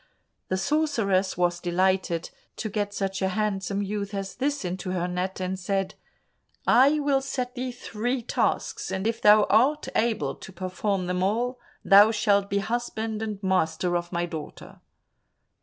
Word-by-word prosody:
The 185 - -1
sorceress 220 - +1
was 175 -1 +1
delighted 180 -1 0 0.2
to 220 - -4
get 205 0 -2
such 195 -1 -3
a 190 - +2
handsome 200 0 -1
youth 200 0 -4
as 195 -1 -4
this 280 -3 -2
into 185 +1 -4
her 180 -1 -1
net, 180 +2 -3
and 185 0 -3
said, 195 +1 -1 0.7
"I 280 +5 +5
will 280 -2 +2
set 255 -2 -3
thee 255 0 -3
three 245 +1 -3
tasks, 440 - -1
and 190 +1 -3
if 230 +1 -1
thou 210 0 +7
art 265 +8 +3
able 220 -12 +1
to - - -11
perform 185 +1 -2
them 180 0 -1
all, 240 +6 0 0.3
thou 205 +2 +8
shalt 205 -2 +2
be 200 - 0
husband 220 0 -2
and 210 -2 -4
master 180 -1 +1
of 175 0 -2
my 175 -1 -1
daughter." 160 -3 -8
200 Hz, 155 wpm, -26 LUFS, 185-230 Hz, 0.7 s, thou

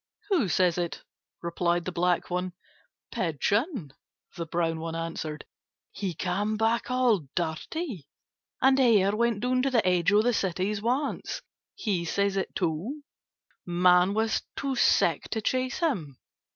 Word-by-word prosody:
"Who 345 - +3
says 180 0 +2
it?" 175 -1 -3 0.4
replied 170 0 0
the 185 - -2
black 175 0 0
one. 180 0 -2 0.6
"Pigeon," 205 - -1 0.4
the 170 -2 -4
brown 165 0 -1
one 165 0 -4
answered. 165 -2 -4 0.5
"He 195 -4 -4
came 205 +6 -1
back 225 +2 +1
all 245 - +2
dirty. 175 - -3 0.6
And 265 0 +5
Hare 210 -6 +4
went 235 -2 +1
down 255 +1 +1
to 275 - +1
the 230 -7 +2
edge 180 0 +3
of 210 +1 +5
the 245 +1 +2
cities 195 +1 -1
once. 275 - -2 0.3
He 205 - -1
says 200 +3 0
it 195 - -2
too. 185 - -2 0.6
Man 180 +2 +4
was 220 0 +1
too 275 -1 -2
sick - - +3
to 225 - -1
chase 255 +3 -1
him. 185 - -1
195 Hz, 140 wpm, -27 LUFS, 170-235 Hz, 0.6 s, And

